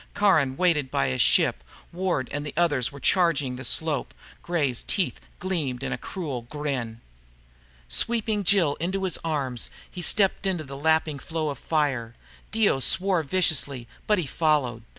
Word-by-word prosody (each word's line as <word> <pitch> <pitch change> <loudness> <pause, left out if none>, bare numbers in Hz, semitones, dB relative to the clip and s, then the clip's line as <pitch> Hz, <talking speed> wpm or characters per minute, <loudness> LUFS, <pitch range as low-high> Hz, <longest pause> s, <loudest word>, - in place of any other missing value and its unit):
Caron 155 -10 +3
waited 165 -7 +2
by 70 - 0
his 65 - 0
ship. - - +3 0.3
Ward 175 -8 -1
and 145 0 -3
the 145 - -7
others 145 -7 +1
were 140 - -10
charging 150 -7 +2
the 130 - -7
slope. 150 +1 -1 0.3
Gray's 145 -8 -1
teeth 190 -4 -1 0.2
gleamed 150 -9 -2
in 135 - -3
a - - -3
cruel 145 -9 -5
grin. 125 -3 -4 0.9
Sweeping 220 - +1
Jill 175 -6 +4
into 190 +3 -2
his 185 -4 -1
arms, 140 -7 -2 0.2
he 180 - -7
stepped 195 +2 +2
into 180 -4 -1
the 135 -1 -8
lapping 160 0 +1
flow 160 -1 -3
of 140 - -8
fire. 135 -7 -1 0.4
Dio 215 -10 +2
swore 185 +5 +3
viciously, 145 -6 0 0.2
but 210 - +3
he 175 - -1
followed. 140 -6 0
150 Hz, 155 wpm, -25 LUFS, 130-180 Hz, 0.9 s, Jill